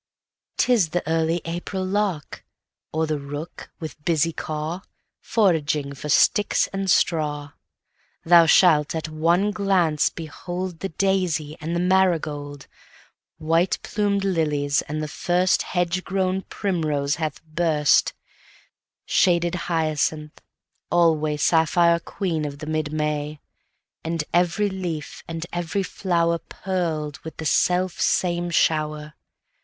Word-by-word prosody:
'Tis 225 -10 +3
the 175 0 -2
early 165 +1 +1
April 175 +3 -4
lark, 190 -6 -2 0.5
Or 160 +1 0
the 155 -1 -2
rooks, 145 +3 -7
with 155 -2 -8
busy 165 0 +1
caw, 155 +4 -4 0.4
Foraging 155 -9 +1
for 145 +2 -7
sticks 205 +8 +3
and 195 0 -2
straw. 150 -5 +1 0.7
Thou 170 0 +7
shalt, 160 -4 +5
at 160 0 -3
one 170 +6 +2
glance, 190 -7 +2
beholdThe 175 +2 -6
daisy 180 -6 0
and 165 +3 -3
the - - 0
marigold; 160 -6 0 0.7
White 165 +3 +1
plum'd 200 -2 0
lilies, 150 -6 +1
and 155 +1 -4
the - - -3
firstHedge 180 +1 0
grown 190 0 -1
primrose 155 -7 -1
that - - -9
hath 155 -1 -3
burst; 155 -2 +2 0.9
Shaded 175 -2 +2 0.2
hyacinth, 155 -2 -1 0.5
alwaySapphire 165 +1 +3
queen 170 -6 -2
of 140 -1 -5
the 150 - -8
mid 155 -1 -2
May; 150 -1 -2 0.6
And 165 -1 -2
every 175 +4 +2
leaf, 175 -5 -5
and 165 0 -5
every 175 +3 -1
flowerPearled 170 -3 -2
with 160 - -9
the 160 - -6
self 180 +3 +1
same 175 -1 +1
shower. 155 -2 0
165 Hz, 115 wpm, -23 LUFS, 150-180 Hz, 0.9 s, Thou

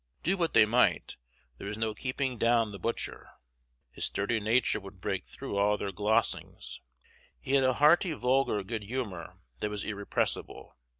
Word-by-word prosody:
Do 185 +4 +2
what 170 -3 0
they 110 -2 +8
might, 120 +4 +2 0.4
there - - -6
was 105 +1 -4
no 110 -1 -1
keeping 130 0 -3
down 115 -2 +3
the 100 - -8
butcher. 115 - -3 0.6
His - - -2
sturdy 110 +3 0
nature 110 +4 +2
would 95 -1 -12
break 95 0 -3
through 135 -7 -5
all 105 +1 +3
their 100 -1 -3
glozings. 105 +4 -1 0.6
He 130 - -6
had 135 -1 +5
a 130 0 +3
hearty 160 +6 +4
vulgar 125 -6 +1
good 110 +3 -4
humor 105 -8 -5 0.2
that 105 - -1
was 105 -1 -4
irrepressible. 100 -1 -2
110 Hz, 165 wpm, -30 LUFS, 100-130 Hz, 0.6 s, they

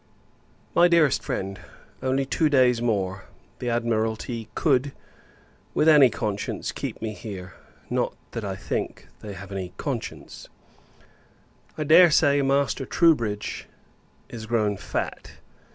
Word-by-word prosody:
MY 175 - +6
DEAREST 165 -5 +3
FRIEND, 95 0 -4 0.4
Only 135 +1 0
two 155 +3 +1
days 125 -4 +4
more, 95 -5 -1 0.3
the 125 - -2
Admiralty 115 0 -1
could, 140 -2 +2 0.8
with 155 - +3
any 150 -5 +8
conscience, 105 -3 -3
keep - - -6
me 110 -1 -3
here; 95 -4 -8 0.3
not - - -1 0.2
that 115 - -5
I 95 -2 -3
think, 95 - -4
they 105 -1 -8
have 100 +1 -9
had 100 -1 -4
any 90 -1 -6
conscience. - - -6 1.3
I 155 - -1
dare 170 +4 +7
say, 145 -2 +4
Master 140 0 +1
Troubridge 115 -12 +1 0.6
is 110 -2 -8
grown 110 -3 +1
fat. - - -5
120 Hz, 125 wpm, -25 LUFS, 105-140 Hz, 1.3 s, any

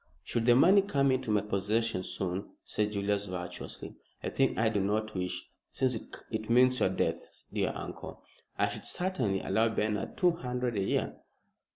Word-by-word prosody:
"Should 115 +6 -1
the 120 - +7
money 185 +10 +7
come 140 -8 +2
into 130 -2 0
my 105 -1 +3
possession 105 0 0
soon," 90 +1 -3
said 105 0 -1
Julius, 100 0 0
virtuously, 90 -1 -6 0.3
"a - - -2
thing 135 -1 +2
I 110 0 +3
do 110 -2 0
not 110 +2 0
wish, 90 -1 -3 0.2
since 130 -1 0 0.4
it 110 0 -3
means 125 +2 +5
your - - +3
death, 95 - -2
dear - - +1
uncle, - - -7 0.3
I - - +2
should - - -7
certainly 130 - 0
allow 110 +4 +2
Bernard 105 -1 -1
two 180 -4 +5
hundred 125 -6 -2
a 100 - +1
year." 95 - 0
110 Hz, 170 wpm, -31 LUFS, 100-125 Hz, 0.4 s, the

